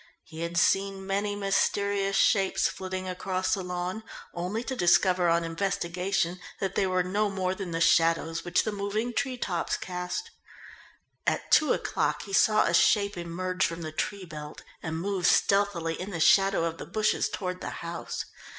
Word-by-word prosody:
He 160 - -11
had 170 0 -3
seen 195 +2 +2
many 200 +1 -1
mysterious 200 0 +1
shapes 195 -2 +3
flitting 185 0 -5
across 185 0 -1
the 195 - 0
lawn, 180 +3 -4 0.3
only 185 +7 -3
to 260 - -4
discover 180 -2 +3
on 170 0 +2
investigation 180 +1 -1 0.2
that 195 -1 -2
they 195 - +1
were 185 -1 +1
no 205 +3 0
more 185 -1 -1
than 190 -1 -6
the 165 0 -2
shadows 165 0 +3
which 175 0 +1
the 215 - -2
moving 210 +4 -2
tree 260 0 -1
tops 175 -8 -1
cast. 180 - -5 1.0
At - - -1
two 305 - +5
o'clock - - 0
he 200 - -9
saw 215 +2 +4
a 170 - 0
shape 200 +3 +4
emerge 180 +2 -2
from 170 0 -1
the 155 - -5
tree 190 +5 -3
belt 150 -2 -9 0.2
and 160 0 -4
move 190 -1 0
stealthily 195 -5 +2
in 190 - -5
the 175 -5 -4
shadow 195 +2 +4
of 165 0 -4
the - - -7
bushes 215 -1 +1
toward 180 -2 -4
the - - -4 0.2
house. 170 0 -5
185 Hz, 170 wpm, -28 LUFS, 170-200 Hz, 1.0 s, two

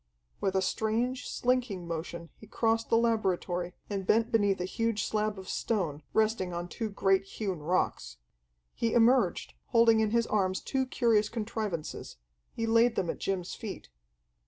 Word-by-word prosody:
With 190 - -1
a 190 - +2
strange, 230 +6 -1
slinking 240 -8 0
motion 170 0 -5
he 215 - -15
crossed 225 +1 0
the 230 - +4
laboratory 185 -6 0
and 195 -2 -4
bent 230 +1 +3
beneath 205 -4 +2
a 180 - -1
huge 225 +2 -1
slab 215 -1 -1
of 190 -1 -9
stone, 170 -10 -1
resting 215 -4 +1
on 175 0 -4
two 220 +4 -4
great 195 -1 +2
hewn 195 -2 -4
rocks. 150 - -1 0.6
He 230 -1 -1
emerged, 240 +3 +3
holding 230 -2 +5
in 220 -1 +2
his 230 +1 +2
arms 190 -4 0
two 265 -1 -1
curious 225 -5 +2
contrivances. 215 -7 -4 0.3
He 230 - -3
laid 230 +1 +4
them 175 -3 0
at - - -10
Jim's 190 -2 -2
feet. 215 - -7
215 Hz, 155 wpm, -30 LUFS, 185-230 Hz, 0.6 s, holding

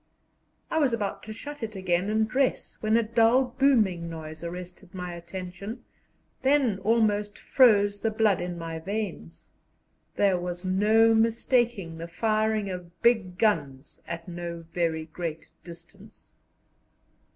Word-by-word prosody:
I 320 - +2
was 275 -6 +2
about 205 -4 -2
to - - -4
shut 290 +6 -8
it 220 -2 -5
again 185 0 0
and 220 0 +2
dress, 260 +3 0
when 215 +1 +3
a 235 - +3
dull 230 +3 +3
booming 210 -11 +3
noise 160 0 -8
arrested 180 +2 -8
my 180 -1 -5
attention, 185 +6 -7 0.6
then 265 -7 +2
almost 210 -1 +1
froze 205 -5 +4
the 225 - +1
blood 215 -2 +2
in 175 0 -4
my 165 -1 -5
veins. 180 - -5 0.6
There 195 -3 +3
was 175 +1 -5
no 215 +4 +4
mistaking 225 -5 +1
the 165 - -5
firing 215 +3 0
of 180 -2 -7
big 215 -7 +2
guns 150 -11 -1
at 170 +1 -6
no 170 -1 -6
very 165 -2 0
great 160 0 -6
distance. 175 +5 -13
195 Hz, 135 wpm, -27 LUFS, 175-225 Hz, 0.6 s, froze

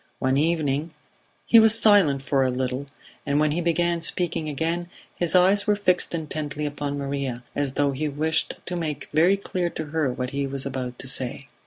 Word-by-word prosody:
One 130 0 0
evening 155 0 -1 0.5
He 230 - +7
was 220 0 +8
silent 190 -11 +5
for 135 -1 +1
a 130 - +1
little, 130 +2 -3 0.4
and 140 +1 0
when 150 0 +2
he 170 +4 -1
began 170 0 0
speaking 165 -3 0
again 165 +4 -2 0.2
his 175 0 +2
eyes 195 +3 +4
were 210 - +3
fixed 180 -4 0
intently 150 -2 -4
upon 145 -1 -4
Maria, 140 -3 -4
as 140 -2 -1
though 145 0 +1
he 150 +3 -3
wished 155 +2 -1
to 180 - -4
make 155 -4 -4
very 175 +5 +4
clear 180 -3 -3
to 160 - -6
her 155 -5 0
what 125 +1 -4
he 140 0 -2
was 135 0 -4
about 130 -2 -5
to 135 - -7
say. 130 +1 -3
150 Hz, 190 wpm, -24 LUFS, 140-170 Hz, 0.5 s, was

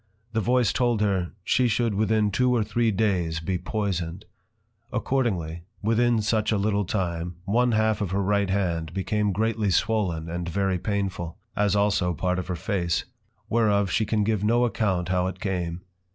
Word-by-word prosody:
The 110 - +1
voice 120 0 +2
told 120 -3 +1
her, 95 -4 +1
she 125 +5 +2
should 115 0 +1
within 105 0 +2
two 125 +3 +2
or 115 - +2
three 115 +2 +1
days 95 -6 0
be 90 +3 -2
poisoned. 95 -4 -3 0.7
Accordingly, 105 -10 -1 0.2
within 115 +1 +2
such 110 0 +1
a 105 - +2
little 100 0 +1
time, 90 -3 -2
one 120 +4 +2
half 110 0 +2
of 100 - -1
her 100 +2 0
right 100 0 +1
hand, 85 -5 -1
became 105 +2 0
greatly 110 +1 0
swollen, 95 -4 0
and 85 +1 -4
very 95 +1 0
painful; 95 -4 -3 0.2
as 105 -1 +2
also 100 -4 +2
part 90 +3 0
of 90 - -5
her 90 - -2
Face; 90 -2 -1 0.4
whereof 100 -3 +2
she 110 -1 +1
can 105 -1 +1
give 105 -1 0
no 120 +3 +3
account 95 -7 0
how 90 0 +1
it 95 0 -5
came. 90 -3 -2
100 Hz, 170 wpm, -25 LUFS, 90-110 Hz, 0.7 s, no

